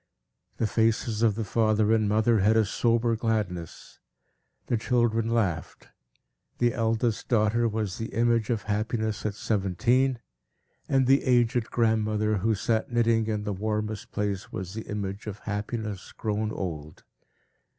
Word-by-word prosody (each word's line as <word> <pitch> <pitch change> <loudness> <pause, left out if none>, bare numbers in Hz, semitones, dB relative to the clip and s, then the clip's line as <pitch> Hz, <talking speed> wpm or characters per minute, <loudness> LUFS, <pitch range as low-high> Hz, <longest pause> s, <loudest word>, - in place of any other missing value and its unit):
The - - +1
faces 110 0 +1
of 110 -3 +3
the 115 - -2
father 110 0 +2
and 110 -2 +2
mother 110 +1 +3
had 105 +3 +4
a 110 - +4
sober 115 +2 +1
gladness; 105 -7 -3 0.7
the - - 0
children 115 -1 +1
laughed; 95 -10 -2 0.7
the 120 0 +2
eldest 115 -1 0
daughter 115 0 +2
was 105 -4 -3
the 115 - -3
image 115 0 +1
of 115 -4 -1
Happiness 110 +1 -1
at 100 - -4
seventeen; 120 +7 +1 0.7
and 135 -1 +3
the 135 +2 +4
aged 120 -2 +2
grandmother, 110 -2 +1
who 110 +3 +1
sat 110 +4 -1
knitting 115 -1 +2
in 105 -1 -1
the 105 -1 -2
warmest 105 +1 -3
place, 100 -2 -3
was 95 0 -5
the 110 +1 -7
image 100 0 -4
of 105 -1 -5
Happiness 105 -2 -5
grown 110 0 -2
old. 80 -7 -6
110 Hz, 140 wpm, -27 LUFS, 105-115 Hz, 0.7 s, had